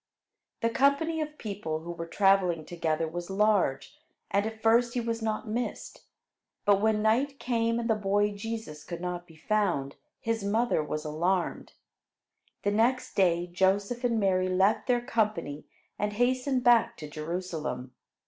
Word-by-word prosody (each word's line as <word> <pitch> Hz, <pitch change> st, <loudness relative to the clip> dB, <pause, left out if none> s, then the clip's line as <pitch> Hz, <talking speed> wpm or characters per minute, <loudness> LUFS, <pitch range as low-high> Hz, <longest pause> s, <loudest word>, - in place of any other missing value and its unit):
The 230 Hz, -, +1 dB
company 280 Hz, +6 st, +2 dB
of 300 Hz, 0 st, -5 dB
people 175 Hz, -7 st, -4 dB
who 170 Hz, +1 st, -6 dB
were 170 Hz, -1 st, -6 dB
traveling 185 Hz, -3 st, +3 dB
together 165 Hz, -2 st, -1 dB
was 175 Hz, +2 st, -6 dB
large, 190 Hz, -10 st, +1 dB, 0.3 s
and 200 Hz, +2 st, +2 dB
at 220 Hz, 0 st, -7 dB
first 235 Hz, +2 st, +4 dB
he -, -, +1 dB
was 230 Hz, -1 st, -2 dB
not 220 Hz, 0 st, -2 dB
missed. 235 Hz, +3 st, -4 dB, 0.6 s
But 200 Hz, -1 st, +4 dB
when 215 Hz, -1 st, +2 dB
night 260 Hz, +6 st, +2 dB
came 230 Hz, -2 st, 0 dB
and 230 Hz, -, -2 dB
the 225 Hz, -, +4 dB
boy 205 Hz, 0 st, +1 dB
Jesus 205 Hz, -7 st, -6 dB
could 170 Hz, -1 st, -6 dB
not 175 Hz, 0 st, -4 dB
be 165 Hz, -, -16 dB
found, 170 Hz, -6 st, 0 dB, 0.2 s
his 225 Hz, -3 st, -2 dB
mother 215 Hz, -4 st, +1 dB
was 150 Hz, +1 st, -4 dB
alarmed. 175 Hz, +4 st, -1 dB, 0.9 s
The 205 Hz, -, +2 dB
next 235 Hz, +5 st, +1 dB
day 175 Hz, -3 st, +2 dB
Joseph 195 Hz, +7 st, 0 dB
and 235 Hz, -2 st, +2 dB
Mary 185 Hz, -2 st, +2 dB
left 190 Hz, +3 st, +2 dB
their 245 Hz, -1 st, +2 dB
company 215 Hz, -, -1 dB, 0.3 s
and 210 Hz, 0 st, -1 dB
hastened 255 Hz, +3 st, +1 dB
back 240 Hz, -2 st, +4 dB
to 150 Hz, -, -7 dB
Jerusalem. 155 Hz, -5 st, -4 dB
205 Hz, 155 wpm, -28 LUFS, 175-230 Hz, 0.9 s, first